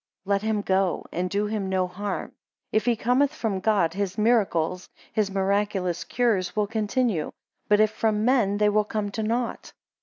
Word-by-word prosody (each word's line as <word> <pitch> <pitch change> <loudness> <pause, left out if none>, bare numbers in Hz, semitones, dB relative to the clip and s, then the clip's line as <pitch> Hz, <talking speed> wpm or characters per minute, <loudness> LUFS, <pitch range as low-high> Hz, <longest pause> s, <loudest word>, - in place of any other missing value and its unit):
Let 200 0 +1
him 215 -1 -1
go, 190 -2 +1
and 180 +2 -2
do 205 +3 0
him 210 -2 -2
no 185 -1 +1
harm; 195 +2 -4 0.4
if 215 - +1
he 240 -1 +3
cometh 250 +5 +2
from 215 -9 -2
God, 190 -5 +2
his 195 -1 -3
miracles, 190 -6 +1 0.2
(his 215 -2 +1
miraculous 195 -2 0
cures) 220 -7 0
will 210 -1 +2
continue; 215 - -1 0.4
but 210 0 +4
if 215 0 +4
from 215 -1 0
men, 235 -6 +3
they 210 0 +3
will 210 +1 +3
come 210 -1 -3
to 220 - -3
nought. 230 +2 -2
205 Hz, 175 wpm, -25 LUFS, 190-220 Hz, 0.4 s, but